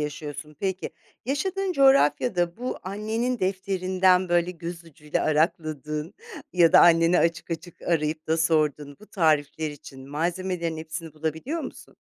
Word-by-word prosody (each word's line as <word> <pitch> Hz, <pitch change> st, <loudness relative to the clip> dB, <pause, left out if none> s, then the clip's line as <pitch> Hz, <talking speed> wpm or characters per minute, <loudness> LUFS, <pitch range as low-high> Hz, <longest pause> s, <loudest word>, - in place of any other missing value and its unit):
yaşıyorsun. 150 Hz, 0 st, -6 dB
Peki 190 Hz, -1 st, -2 dB, 0.3 s
yaşadığın 375 Hz, +8 st, -1 dB
coğrafyada 240 Hz, -, +3 dB
bu 250 Hz, +2 st, -4 dB
annenin 220 Hz, +5 st, -2 dB
defterinden 185 Hz, -1 st, +1 dB
böyle 175 Hz, 0 st, +2 dB
göz 170 Hz, 0 st, -7 dB
ucuyla 150 Hz, -1 st, -4 dB
arakladığın 155 Hz, 0 st, -1 dB, 0.4 s
ya 170 Hz, -3 st, +5 dB
da -, -, +9 dB
anneni 170 Hz, +1 st, +5 dB
açık 165 Hz, +1 st, 0 dB
açık 165 Hz, +2 st, -7 dB
arayıp 155 Hz, -1 st, -1 dB
da 160 Hz, -, +1 dB
sorduğun 150 Hz, -3 st, +1 dB
bu 215 Hz, -, -14 dB
tarifler 155 Hz, -3 st, +1 dB
için 135 Hz, -2 st, -12 dB
malzemelerin 170 Hz, +2 st, -2 dB
hepsini 160 Hz, 0 st, -7 dB
bulabiliyor 160 Hz, -, -3 dB
musun? -, -, -9 dB
170 Hz, 130 wpm, -25 LUFS, 155-185 Hz, 0.4 s, da